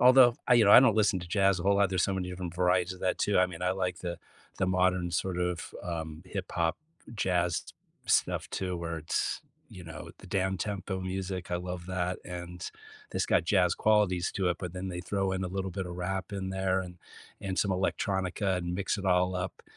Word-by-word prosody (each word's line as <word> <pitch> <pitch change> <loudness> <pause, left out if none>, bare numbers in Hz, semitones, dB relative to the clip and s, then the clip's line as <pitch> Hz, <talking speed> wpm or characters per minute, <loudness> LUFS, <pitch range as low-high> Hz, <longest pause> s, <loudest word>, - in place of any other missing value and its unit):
Although, 125 -1 +7
I 125 - +6
you 115 -2 +6
know, 100 - +6
I 120 - +11
don't 115 -5 +5
listen 105 -3 +3
to 85 - -7
jazz 95 -1 +3
a - - -4
whole 100 0 +4
lot, 100 -2 +4
there's 95 -2 +2
so 95 - 0
many 90 -1 -2
different 90 -1 -5
varieties 90 0 +2
of 90 - -15
that 90 - 0
too, 100 -2 +2
I 90 - +5
mean, 90 -1 -8
I 90 0 +2
like 90 -2 -2
the 85 -1 -4 0.4
the 95 - +2
modern 90 -1 +2
sort 90 +1 -1
of, 90 -2 -2
um, 80 -2 -4
hip 95 -1 -4
hop 85 0 +1 0.4
jazz 90 -4 +1 0.4
stuff - - +2
too, 90 -2 -2
where 85 -1 -4
it's, 80 - -1 0.3
you 90 -2 -11
know, 80 -1 -8
the 95 - -13
downtempo 95 0 -2
music, 95 -1 -4
I - - +2
love 90 0 -5
that, 90 -1 -2
and 90 0 -6 0.4
this - - +1
got - - +3
jazz 90 -2 +3
qualities 105 -5 +2
to 95 -3 0
it, 90 - -1
but 90 -2 -5
then 95 +1 -4
they 90 -1 -4
throw 95 +2 -1
in 95 0 -1
a - - -2
little 95 0 -3
bit 95 0 -4
of 90 - -6
rap 95 +1 -3
in 95 -1 -3
there 95 0 +1
and 90 -1 -8 0.4
and 95 -1 -3
some 100 - +2
electronica 95 0 0
and 85 0 -3
mix 100 +2 -1
it 100 - -5
all 90 0 +3
up. 90 +1 -4
90 Hz, 220 wpm, -30 LUFS, 90-95 Hz, 0.4 s, I